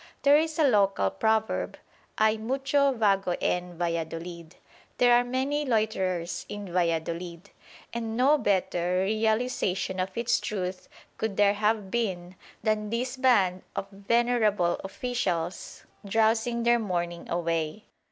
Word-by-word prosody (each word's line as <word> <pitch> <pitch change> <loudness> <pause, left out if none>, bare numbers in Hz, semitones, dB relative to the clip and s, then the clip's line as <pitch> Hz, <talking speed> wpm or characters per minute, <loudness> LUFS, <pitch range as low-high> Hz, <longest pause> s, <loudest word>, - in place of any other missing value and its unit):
There 285 +1 +6
is 315 0 +1
a 320 - +3
local 195 - +3
proverb, 220 - 0 0.4
"Hay 215 0 +4
mucho 270 +5 +1
vago 195 -6 +1
en 180 -1 -2
Valladolid" 170 0 -4 0.4
("There 245 -1 +5
are 240 0 +5
many 265 +4 -1
loiterers 190 - -1
in 205 -4 -7
Valladolid"), 170 +1 -2 0.4
and 225 -1 -3
no 280 +4 +4
better 180 -3 +1
realisation 215 -3 0
of 185 +2 -3
its 235 +1 +2
truth 185 -3 -4 0.3
could 220 -3 -2
there 205 -1 +5
have 210 -1 0
been 185 -6 -2 0.3
than 215 -1 0
this 250 +3 -2
band 205 -9 +3
of 195 - -4
venerable 210 -3 +1
officials, 190 -6 -3 0.2
drowsing 225 +3 +1
their 240 0 +4
morning 175 -5 -3
away. 165 +2 -2
205 Hz, 125 wpm, -27 LUFS, 180-235 Hz, 0.4 s, There